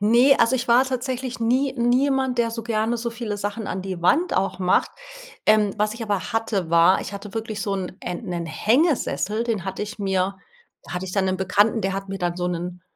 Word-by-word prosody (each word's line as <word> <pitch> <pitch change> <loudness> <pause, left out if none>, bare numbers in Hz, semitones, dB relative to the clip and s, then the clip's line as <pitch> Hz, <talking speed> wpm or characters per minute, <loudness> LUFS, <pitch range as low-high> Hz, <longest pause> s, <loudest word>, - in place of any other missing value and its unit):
Ne. 240 +6 +5
Also, 230 - +4
ich 245 -1 -4
war 245 +3 +6
tatsächlich 255 -1 -3
nie 255 +4 +2
nie 245 +2 +3
jemand, 265 -3 0
der 230 -1 +2
so 230 0 -5
gerne 225 +1 0
so 235 0 -3
viele 230 -3 -4
Sachen 205 +2 -4
an 185 - -3
die 185 -2 -5
Wand 325 - +3
auch 195 0 0
macht. 180 -1 +2 0.6
Ähm, 210 -2 +4
was 210 +1 +1
ich 230 - -7
aber 205 +1 -2
hatte, 210 -6 -1
war: 170 +2 +5
Ich - - -7
hatte 200 +1 -8
wirklich 220 -2 -4
so 200 - -2
'n 185 -1 -5
äh, 180 - -4
'nen 175 -3 -4
Hängesessel. 230 - +1
Den 220 -6 -2
hatte 190 +1 -4
ich 210 +1 -6
mir 195 -1 0 0.5
hatte 180 +1 -4
ich 185 - -6
dann 195 -2 +1
'nen 185 0 0
Bekannten, 205 +4 +2
der 195 -1 -1
hat 195 0 -5
mir 195 - -4
dann 175 -1 -1
so 180 0 -1
'nen 175 0 -5
210 Hz, 220 wpm, -23 LUFS, 190-235 Hz, 0.6 s, war